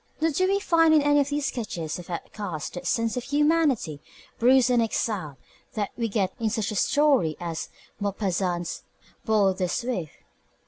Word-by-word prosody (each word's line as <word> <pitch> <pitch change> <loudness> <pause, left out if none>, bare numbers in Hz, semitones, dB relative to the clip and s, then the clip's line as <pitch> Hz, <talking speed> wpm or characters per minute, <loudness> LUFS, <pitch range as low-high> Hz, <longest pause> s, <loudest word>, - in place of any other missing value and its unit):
Nor 325 +1 +2
do 370 +6 +1
we 395 +1 +2
find 330 -4 +4
in 300 - +4
any 290 0 +4
of 285 0 +1
these 290 -1 -1
sketches 175 -9 -4
of 175 - -11
outcasts 170 -2 -5
that 180 0 -6
sense 230 +3 0
of 250 - -2
humanity 290 - +1 0.4
bruised 255 +1 +5
and 240 -1 +4
exiled 210 -9 -2 0.4
that 210 -2 -2
we 230 -2 -2
get 195 -3 0
in 225 -2 0
such 220 -2 -2
a - - -4
story 265 - +2
as 170 -2 -4 0.3
Maupassant's 185 -4 -2 0.4
Boule 210 -4 +3
de 185 0 -1
Suif. 195 - -2
220 Hz, 170 wpm, -26 LUFS, 180-285 Hz, 0.4 s, bruised